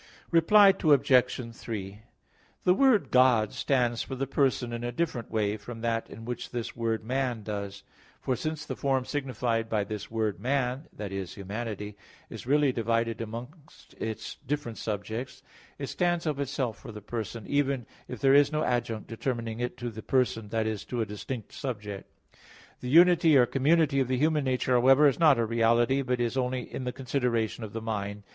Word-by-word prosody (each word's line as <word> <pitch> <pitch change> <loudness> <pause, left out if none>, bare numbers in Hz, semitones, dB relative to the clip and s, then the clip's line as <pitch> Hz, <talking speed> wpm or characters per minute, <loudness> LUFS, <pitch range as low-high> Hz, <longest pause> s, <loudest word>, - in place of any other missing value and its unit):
Reply 195 +5 +7
Obj. 130 -5 +3
3: 100 -4 -6 0.6
The 180 - +5
word 255 -2 +3
"God" 125 -4 +4
stands 120 -4 +1
for 135 - -5
the 135 +1 -2
person 130 -3 0
in 120 0 -4
a 120 - -2
different 120 -4 -2
way 105 -1 0
from 115 +2 -9
that 115 -1 -1
in 115 +1 -10
which 125 +1 -5
this 120 -2 -5
word 115 -1 -1
"man" 125 -2 -1
does; 100 -1 -5 0.4
for 130 - -1
since 155 +4 -4
the - - -4
form 135 -2 0
signified 125 -5 -2
by 105 -2 +1
this 105 0 -6
word 110 -3 -1
"man" 130 +2 -1
that 100 -2 -7
is, 95 -2 -5
humanity 105 0 -5 0.4
is - - -8
really 145 0 +4
divided 115 -1 -1
among 115 +5 -6 0.5
its 110 -1 -5
different 140 -5 -4
subjects, 110 +5 -5 0.3
it 140 - -4
stands 175 +3 0
of 150 -3 -1
itself 135 -5 -2
for 125 - -9
the 105 - -8
person, 110 0 -5
even 140 -4 0 0.2
if 125 - -7
there 135 0 +4
is 145 +1 +5
no 155 0 0
adjunct 120 -3 -1
determining 115 -1 -3
it 125 0 -3
to 120 -1 -4
the 110 0 -8
person 115 -4 0
that 110 0 0
is, 110 -2 -3
to 120 -2 -3
a - - 0
distinct 105 +2 -6
subject. 105 -7 -6 0.7
The 125 - -5
unity 165 0 +6
or 125 - +6
community 140 +2 +2
of 130 - +1
the 130 0 0
human 150 +1 +2
nature, 130 0 0
however, 130 +4 +6
is 140 - +1
not 155 -5 +6
a 115 - +1
reality, 115 +4 +2
but 125 -2 -1
is 120 +2 -1
only 125 0 0
in 130 - -4
the 125 - -1
consideration 125 -4 -1
of 105 - -7
the 115 - -4
mind. 105 -2 -4
120 Hz, 185 wpm, -28 LUFS, 110-135 Hz, 0.7 s, Reply